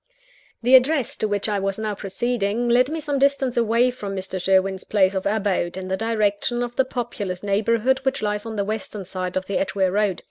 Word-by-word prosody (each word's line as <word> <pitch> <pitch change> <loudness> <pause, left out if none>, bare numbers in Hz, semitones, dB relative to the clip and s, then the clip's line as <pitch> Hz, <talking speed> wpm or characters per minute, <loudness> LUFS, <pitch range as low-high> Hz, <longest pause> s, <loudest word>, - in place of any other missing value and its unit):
The 250 +2 +3
address 260 0 +5
to 215 - 0
which 205 0 -1
I 205 -2 0
was 195 0 -2
now 215 -1 -2
proceeding, 215 +3 -1
led 250 +2 +4
me 320 +1 -3
some 290 -2 -2
distance 275 -2 +2
away 235 +2 +3
from 205 -5 -6
Mr. 190 -1 -4
Sherwin's 190 0 +2
place 195 -2 +2
of 190 0 -1
abode, 200 -4 0
in 185 0 -6
the 190 - +1
direction 225 +2 0
of 240 0 -5
the 265 - +2
populous 210 -8 -4
neighbourhood 230 +6 +1
which 265 -3 -2
lies 210 0 -1
on 225 - -5
the 200 -1 -1
western 210 -1 -4
side 185 0 -4
of 185 - -2
the 195 - -1
Edgeware 190 0 0
Road. 205 -2 +1
210 Hz, 210 wpm, -23 LUFS, 195-240 Hz, -, address